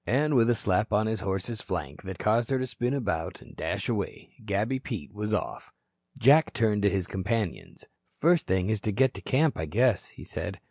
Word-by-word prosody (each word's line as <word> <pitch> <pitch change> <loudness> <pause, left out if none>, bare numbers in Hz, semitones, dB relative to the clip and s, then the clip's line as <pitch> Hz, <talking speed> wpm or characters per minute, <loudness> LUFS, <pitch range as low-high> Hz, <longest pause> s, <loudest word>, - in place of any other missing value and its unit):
And 150 +4 +2
with 120 -3 +5
a 120 - +4
slap 105 +1 0
on 105 +1 +3
his 110 0 -1
horse's 100 +4 -3
flank 75 -7 -4
that 95 -2 -7
caused 115 +4 +2
her 135 - +2
to 130 - -1
spin 125 +1 -2
about 100 -11 -2
and - - -15
dash - - -3
away, - - -3
Gabby 105 +6 0
Pete 105 - -6
was 105 +1 -3
off. 105 - -3 0.5
Jack 145 +6 +5
turned 105 -2 +2
to 100 - +4
his 95 -2 -1
companions. 100 +1 -3 0.3
"First 170 +2 +3
thing 95 +2 +1
is 110 -2 -1
to 105 - -1
get 130 +5 +3
to - - -8
camp, 150 - +2
I 80 - -1
guess," 115 +4 +2
he - - -13
said. - - -5
110 Hz, 205 wpm, -28 LUFS, 95-125 Hz, 0.5 s, with